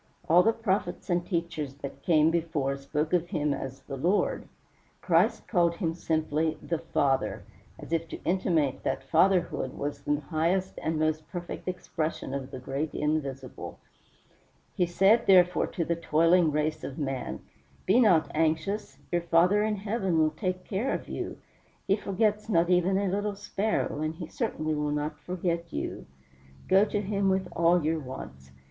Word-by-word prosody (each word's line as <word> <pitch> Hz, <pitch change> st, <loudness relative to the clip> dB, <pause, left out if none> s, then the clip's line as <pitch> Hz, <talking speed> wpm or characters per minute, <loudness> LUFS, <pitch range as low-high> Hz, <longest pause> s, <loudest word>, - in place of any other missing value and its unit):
All 170 Hz, +3 st, +7 dB
the 225 Hz, -, +4 dB
prophets 195 Hz, -6 st, -2 dB
and 175 Hz, 0 st, +2 dB
teachers 165 Hz, -6 st, -3 dB
that 140 Hz, -1 st, -8 dB
came 160 Hz, -1 st, +4 dB
before 160 Hz, -5 st, 0 dB
spoke 150 Hz, +3 st, -3 dB
of 175 Hz, -1 st, +2 dB
him 150 Hz, -3 st, 0 dB
as 135 Hz, -1 st, -6 dB
"the 135 Hz, -, -7 dB
Lord." 180 Hz, +9 st, +1 dB, 0.5 s
Christ -, -, +2 dB
called 170 Hz, -3 st, +2 dB
him 165 Hz, -3 st, -1 dB
simply 160 Hz, -1 st, 0 dB
"THE 165 Hz, -2 st, -3 dB
FATHER," 140 Hz, -4 st, 0 dB, 0.3 s
as -, -, -7 dB
if 165 Hz, 0 st, 0 dB
to -, -, -8 dB
intimate 170 Hz, -6 st, +1 dB
that -, -, -2 dB
Fatherhood 170 Hz, -3 st, +2 dB
was 145 Hz, 0 st, -4 dB
the 145 Hz, +1 st, 0 dB
highest 170 Hz, +5 st, -1 dB
and 160 Hz, 0 st, -1 dB
most 155 Hz, 0 st, -1 dB
perfect 175 Hz, 0 st, -6 dB
expression 165 Hz, -6 st, -3 dB
of 135 Hz, -1 st, -4 dB
the 130 Hz, -, -7 dB
great 135 Hz, +4 st, -4 dB
Invisible. 140 Hz, -4 st, -3 dB, 1.0 s
He 180 Hz, -, +1 dB
said, 195 Hz, +7 st, +4 dB
therefore, 180 Hz, -2 st, +5 dB
to 170 Hz, -, -3 dB
the 170 Hz, -, 0 dB
toiling 165 Hz, +1 st, +3 dB
race 150 Hz, +1 st, -1 dB
of 135 Hz, -, -6 dB
man: 135 Hz, -4 st, -3 dB, 0.4 s
"Be 210 Hz, +6 st, +4 dB
not 180 Hz, -10 st, +4 dB
anxious, 160 Hz, +6 st, 0 dB
your 175 Hz, -1 st, +1 dB
Father 170 Hz, +4 st, +4 dB
in 215 Hz, 0 st, +1 dB
Heaven 200 Hz, -3 st, -1 dB
will 155 Hz, -1 st, +3 dB
take 185 Hz, +3 st, -3 dB
care 220 Hz, +8 st, -1 dB
of -, -, -4 dB
you. -, -, -4 dB, 0.5 s
He 195 Hz, -, +3 dB
forgets 210 Hz, +1 st, 0 dB
not 170 Hz, -3 st, +3 dB
even 180 Hz, +2 st, +3 dB
a 200 Hz, 0 st, 0 dB
little 205 Hz, +2 st, -1 dB
sparrow, 205 Hz, -5 st, -1 dB
and 155 Hz, +1 st, -2 dB
he 165 Hz, -, -6 dB
certainly 155 Hz, 0 st, -2 dB
will 150 Hz, 0 st, -1 dB
not 150 Hz, +1 st, -2 dB
forget 170 Hz, -2 st, -3 dB
you. -, -, -4 dB, 0.6 s
Go 195 Hz, +2 st, +5 dB
to 205 Hz, -1 st, -1 dB
him 200 Hz, -1 st, 0 dB
with 190 Hz, 0 st, +1 dB
all 170 Hz, 0 st, +4 dB
your 160 Hz, +1 st, +1 dB
wants. 70 Hz, -, -9 dB
165 Hz, 165 wpm, -28 LUFS, 150-185 Hz, 1.0 s, All